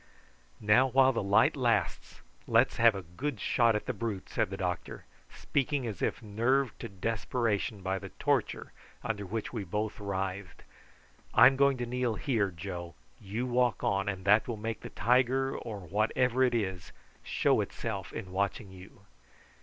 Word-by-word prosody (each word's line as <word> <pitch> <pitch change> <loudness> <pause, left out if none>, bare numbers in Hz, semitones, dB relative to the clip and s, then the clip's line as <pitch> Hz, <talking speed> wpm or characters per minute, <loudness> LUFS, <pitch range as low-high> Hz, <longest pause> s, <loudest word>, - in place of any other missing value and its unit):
"Now 110 +5 +4
while 130 +1 +4
the - - -1
light 100 0 +3
lasts - - -1 0.3
let's - - +3
have 115 -2 +5
a 95 - -5
good 110 - -5
shot 115 -2 +2
at 105 - -2
the - - -2
brute," 110 -5 -4
said - - 0
the - - -5
doctor, - - -4 0.3
speaking 140 -1 -1
as 105 -6 -5
if 135 - -1
nerved 120 +4 0
to - - -6
desperation 105 0 -2
by 95 +1 -1
the - - -8
torture - - -1 0.3
under 105 -3 -3
which 110 +4 -4
we 110 -4 -3
both 105 +5 -3
writhed. 95 -2 -4 0.7
"I'm 125 +4 +8
going 140 0 +3
to 120 - -3
kneel 125 -1 -1
here, 110 -4 0
Joe; 85 -1 -7 0.2
you 110 +5 -4
walk 125 -1 +1
on, 100 +1 +1
and 95 -1 -5
that 105 +2 +4
will 120 -3 -3
make 110 +2 -4
the - - -8
tiger, 130 +2 +2
or 105 -4 -6
whatever 110 +7 +1
it 125 -2 +2
is, 95 -6 -3 0.3
show - - +1
itself 100 -5 -5
in 95 -5 -7
watching 100 +2 -2
you." 95 0 -14
110 Hz, 165 wpm, -30 LUFS, 100-125 Hz, 0.7 s, I'm